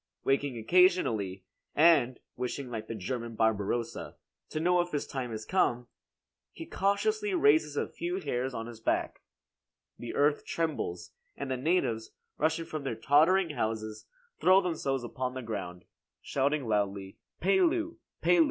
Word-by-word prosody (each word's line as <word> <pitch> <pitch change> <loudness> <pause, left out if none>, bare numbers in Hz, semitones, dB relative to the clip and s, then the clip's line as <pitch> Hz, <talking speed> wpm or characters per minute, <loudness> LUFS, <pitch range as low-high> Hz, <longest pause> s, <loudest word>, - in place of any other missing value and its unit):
Waking 135 -2 +1
occasionally, 115 - +2 0.3
and 145 -6 +5 0.2
wishing 125 +1 -4
like 110 -2 -5
the 115 - -4
German 115 +3 -4
Barbarossa, 110 +1 -1 0.3
to 155 - -3
know 180 +2 +3
if 175 0 -5
his 145 - -1
time 130 -4 -4
is 110 0 -5
come, 125 -10 +1 0.6
he - - -8
cautiously 405 - 0
raises 150 - +3
a - - 0
few 175 +2 -3
hairs 130 -6 -2
on 115 -3 -5
his 115 -1 -9
back. 115 - -1 0.8
The 120 - -6
earth 145 +1 +2
trembles, 145 - -3 0.3
and 140 -1 -4
the - - +1
natives, 125 -7 0 0.3
rushing 160 +2 +1
from 155 -3 -5
their 135 -4 -2
tottering 160 - +4
houses 110 -4 -3 0.3
throw 185 +1 +6
themselves 155 -8 -1
upon 125 +1 -4
the 130 - -5
ground, 90 -6 -5 0.3
shouting 140 -1 0
loudly 100 -2 -1 0.2
"Pelu! 335 - +2 0.3
Pelu!" 175 +1 +5
135 Hz, 145 wpm, -30 LUFS, 115-170 Hz, 0.8 s, throw